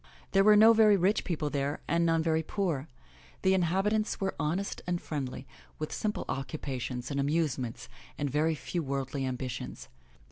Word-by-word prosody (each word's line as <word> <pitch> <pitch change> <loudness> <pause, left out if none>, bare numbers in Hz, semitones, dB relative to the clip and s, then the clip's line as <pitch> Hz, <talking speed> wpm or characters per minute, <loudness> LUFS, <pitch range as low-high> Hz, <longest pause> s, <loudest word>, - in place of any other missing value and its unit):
There 195 0 +5
were 210 +1 +7
no 220 +2 +8
very 215 -2 +6
rich 195 +4 +2
people 155 -5 -2
there 140 +1 -1
and 170 0 +2
none 165 -1 +2
very 160 -1 +2
poor. 160 -4 -2 0.6
The 190 0 +4
inhabi 190 +3 +2
tants 215 0 0
were 195 -1 -1
honest 180 +7 -2
and 175 -1 0
friendly, 135 -5 -5 0.3
with 155 - -4
simple 210 -1 -2
occupations 130 -2 -4
and 140 - -1
amuse 145 0 +1
ments 125 0 -5 0.3
and 145 - -1
very 155 +4 +1
few 130 +5 -3
worldly 135 -1 -2
ambitions. 125 - -5
155 Hz, 170 wpm, -30 LUFS, 135-190 Hz, 0.6 s, no